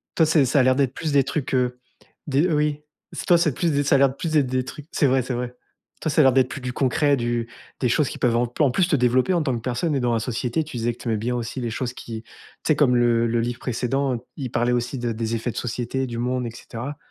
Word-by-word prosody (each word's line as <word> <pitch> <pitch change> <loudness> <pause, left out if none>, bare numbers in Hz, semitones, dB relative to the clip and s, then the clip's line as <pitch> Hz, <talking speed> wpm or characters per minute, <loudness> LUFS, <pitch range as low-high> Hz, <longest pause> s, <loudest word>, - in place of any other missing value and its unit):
toi, 160 - +5
c'est 155 -3 +4
ça 140 +3 +2
a - - +5
l'air 130 0 +4
d'être 135 -1 +1
plus 160 -2 -2
des 140 -1 +4
trucs, 140 0 -3
heu, 125 -1 +1 0.5
des 145 +3 +2
oui, 150 -1 +1 0.5
toi 175 - +6
c'est 160 -5 +2
plus 170 +3 0
des 145 0 +1
ça 140 0 +3
a - - +6
l'air 140 -1 +5
de 130 - -9
plus 165 +1 -3
d'être 150 -4 +3
des 130 0 -1
trucs 145 +2 -9
c'est 145 - +2
vrai 130 0 +3
c'est 125 +1 -4
vrai. 125 0 -4 0.4
Toi, 160 - -1
ça 155 - +4
a - - +6
l'air 135 - +6
d'être 130 0 +3
plus 140 - -6
du 125 0 -4
concret, 140 +2 +2
du 120 -1 -1 0.3
des 125 - +1
choses 140 +3 +2
qui - - -7
peuvent 120 -2 +2
en 120 0 +1
en 140 -4 +4
plus 175 +6 +2
te 155 - +2
développer 125 +6 +2
en 175 - +2
tant 135 -4 0
que 115 - -4
personne 130 +7 -1
et - - +1
dans 120 -1 +1
la 115 - +1
société 125 +5 -1
tu 150 -5 -8
disais 120 +1 0
que - - -17
tu - - -6
aimais 110 - +1
bien 120 +3 -2
aussi 120 +2 -4
les 120 - -2
choses 125 +1 -3
qui, 110 -3 -7
tu - - -25 0.4
sais? 155 - +4
Comme 130 -4 +3
le 120 -1 +3
le 115 +1 +1
livre 120 +1 -3
précédent, 125 0 -1
il 130 -5 -4
parlait 120 +1 +1
aussi 120 +2 -1
de 120 -1 -1
des 115 0 -2
effets 115 +1 -2
de - - -11
société, 125 +2 -2
du 115 - -5
monde 125 +1 -1
et 115 - -5
cetera. 120 +4 -7
125 Hz, 290 wpm, -23 LUFS, 120-140 Hz, 0.5 s, toi